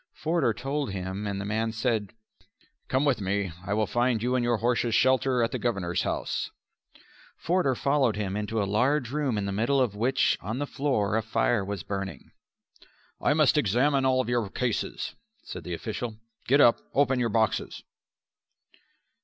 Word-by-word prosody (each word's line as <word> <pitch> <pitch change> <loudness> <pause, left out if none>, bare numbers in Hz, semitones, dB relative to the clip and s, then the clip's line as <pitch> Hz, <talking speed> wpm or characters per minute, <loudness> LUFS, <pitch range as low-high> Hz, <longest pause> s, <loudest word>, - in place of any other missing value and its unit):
Forder 160 -6 +1
told 135 +3 -3
him, 95 +2 -4
and 100 -1 -3
the 100 - -4
man 110 +2 -1
said. 110 -3 -1 0.7
"Come 130 +3 +1
with 135 -6 +2
me. 100 -1 -1
I 100 +1 -1
will 110 0 +2
find 120 0 +1
you 125 +1 +1
and 125 -1 +1
your 120 -1 +2
horses 120 0 +1
shelter 130 +1 +3
at 115 - 0
the - - -3
Governor's 95 -8 -1
house." - - -2 0.9
Forder 170 -7 +1
followed 140 -3 +2
him 100 -2 -2
into 105 +1 -2
a - - +2
large 125 +5 +1
room 140 -6 0
in 100 - -1
the 100 - -2
middle 115 +8 +1
of 125 -6 +1
which 120 +6 +2
on 110 +5 -4
the 145 - -1
floor 130 -8 0
a - - +1
fire 110 0 +1
was 100 -3 -4
burning. 95 0 -5 0.9
"I 145 - +3
must 155 -1 +4
examine 135 +5 +2
all 130 -2 +2
your 120 -4 0
cases," 120 +1 -2 0.3
said 90 - -8
the 85 +1 -4
official. 110 +4 -5 0.3
"Get 140 +3 +5
up. 120 - +6 0.2
Open 135 -2 +3
your 120 -1 +1
boxes." 110 -1 0
115 Hz, 170 wpm, -27 LUFS, 105-130 Hz, 0.9 s, up